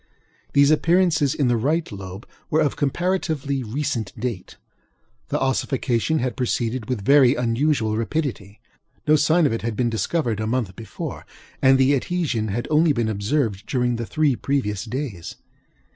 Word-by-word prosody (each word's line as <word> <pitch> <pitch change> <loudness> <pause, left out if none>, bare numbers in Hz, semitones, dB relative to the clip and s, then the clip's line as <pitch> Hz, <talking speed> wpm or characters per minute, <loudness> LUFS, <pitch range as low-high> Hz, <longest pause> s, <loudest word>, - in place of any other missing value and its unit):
These 140 +1 +5
appearances 165 -3 +3
in 140 - +1
the 120 -1 +2
right 150 +7 0
lobe 95 0 -8 0.2
were 155 - +2
of 150 - +1
comparatively 150 -3 -1
recent 115 -3 -3
date. 115 -6 -5 0.7
The - - -1
ossification 135 +1 0
had 130 -3 -1
proceeded 120 -2 -2
with 110 -6 -3
very 135 -1 +6
unusual 120 -1 +1
rapidity; 115 -4 -3 0.5
no 155 - +6
sign 155 +3 +3
of 140 - +2
it 115 - -2
had 115 -1 -3
been 120 +1 0
discovered 115 -1 -1
a 110 - -2
month 115 -6 -1
before, 110 -4 -7 0.4
and 135 0 +6
the 135 +2 +4
adhesion 140 -6 -1
had 110 +4 -3
only 155 0 +4
been 115 -4 0
observed 105 0 -1
during 125 -2 0
the 115 -1 -4
three 150 -4 +1
previous 110 -8 -2
days. 120 - -5
130 Hz, 155 wpm, -23 LUFS, 110-150 Hz, 0.7 s, very